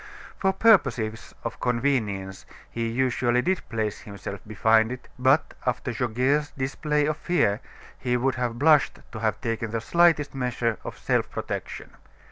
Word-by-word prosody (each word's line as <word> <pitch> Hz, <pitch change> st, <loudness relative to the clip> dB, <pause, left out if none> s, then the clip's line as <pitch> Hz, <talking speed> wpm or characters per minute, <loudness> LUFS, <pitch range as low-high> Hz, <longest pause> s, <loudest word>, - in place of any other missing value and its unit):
For 190 Hz, -, +3 dB
purposes 125 Hz, -, +2 dB
of 115 Hz, -, -5 dB
convenience 115 Hz, -7 st, -1 dB, 0.2 s
he 115 Hz, 0 st, -2 dB
usually 125 Hz, 0 st, +1 dB
did 190 Hz, 0 st, +1 dB
place 110 Hz, -3 st, -2 dB
himself 100 Hz, -1 st, -7 dB
behind 110 Hz, +2 st, +3 dB
it; 125 Hz, 0 st, -7 dB
but 135 Hz, +4 st, +3 dB
after 125 Hz, 0 st, -1 dB
Goguet's 130 Hz, +6 st, +1 dB
display 150 Hz, +3 st, 0 dB
of 155 Hz, 0 st, -1 dB
fear, 135 Hz, -, +1 dB, 0.4 s
he 125 Hz, -1 st, 0 dB
would 130 Hz, +2 st, +1 dB
have 120 Hz, -1 st, -2 dB
blushed 150 Hz, +2 st, +4 dB
to 110 Hz, -, -6 dB
have 110 Hz, -1 st, 0 dB
taken 115 Hz, -2 st, -2 dB
the 115 Hz, +1 st, -2 dB
slightest 165 Hz, +4 st, +3 dB
measure 125 Hz, -3 st, -1 dB
of -, -, -7 dB
self -, -, 0 dB
protection. -, -, -5 dB
125 Hz, 145 wpm, -25 LUFS, 115-140 Hz, 0.4 s, blushed